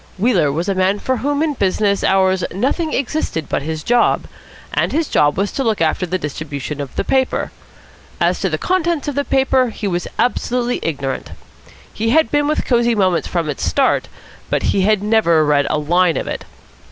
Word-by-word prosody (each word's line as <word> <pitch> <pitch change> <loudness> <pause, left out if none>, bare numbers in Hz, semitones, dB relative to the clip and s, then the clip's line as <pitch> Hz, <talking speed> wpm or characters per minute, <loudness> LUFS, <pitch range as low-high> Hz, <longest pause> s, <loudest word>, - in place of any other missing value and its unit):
Wheeler 185 - +2
was 165 +6 -2
a 200 - +1
man 190 +2 +1
for 260 +5 -1
whom 285 +5 0
in 310 -2 0
business 200 -3 0
hours 190 -1 +2
nothing 280 - -1
existed 260 - -2
but - - -1
his 155 +1 -4
job; 240 0 +2 0.5
and - - +1
his 320 0 0
job 145 0 +2
was 200 +1 0
to 270 - -2
look 220 -4 0
after 165 +3 0
the 185 +2 -1
distribution 150 -2 -5
of 140 - -7
the - - -1
paper. 265 -1 0 0.7
As - - +1
to - - 0
the - - -1
contents 345 -5 0
of 290 - -1
the 285 +1 0
paper 265 -2 +2
he 215 -1 -5
was 175 -2 -2
absolutely 245 0 0
ignorant. 135 -4 -3 0.6
He 225 +1 -1
had 315 +6 +3
been 290 0 +2
with 305 - 0
Cosy 240 -1 +2
Moments 185 -4 +1
from 170 -3 -2
its 150 - -4
start, 270 -2 +1 0.4
but - - 0
he 195 - +2
had 205 +1 +2
never 190 -8 +3
read 145 -1 +2
a 155 - +1
line 165 +1 +2
of - - -2
it. - - -5
200 Hz, 195 wpm, -18 LUFS, 165-260 Hz, 0.7 s, had